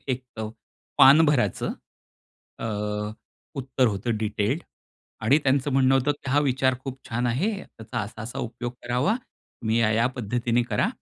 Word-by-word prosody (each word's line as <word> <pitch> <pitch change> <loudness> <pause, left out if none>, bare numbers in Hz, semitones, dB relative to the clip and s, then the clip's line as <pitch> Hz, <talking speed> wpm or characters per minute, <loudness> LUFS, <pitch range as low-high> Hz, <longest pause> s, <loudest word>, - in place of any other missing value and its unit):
एक 130 0 -1 0.7
पान 150 +5 +9
भराचं 125 -10 +1 0.9
अ, - - -5 0.9
उत्तर 130 -1 +1
होतं 110 +2 -1
डिटेल्ड 110 +8 -1 0.6
आणि 130 +7 +5
त्यांचं 135 +1 +2
म्हणणं 135 0 +4
होतं, 135 +2 +3
की 140 -2 -7
"हा 145 - +4
विचार 130 -2 +2
खूप 135 -1 -5
छान 120 +1 -1
आहे. 140 - +1 0.3
त्याचा 115 +2 -5
असा-असा 110 +2 -6
उपयोग 120 +1 -4
करावा, 125 - +1
तुम्ही 115 - -4
या-या 115 +2 +3
पद्धतीने 120 +1 0
करा" - - +2
125 Hz, 135 wpm, -25 LUFS, 115-135 Hz, 0.9 s, पान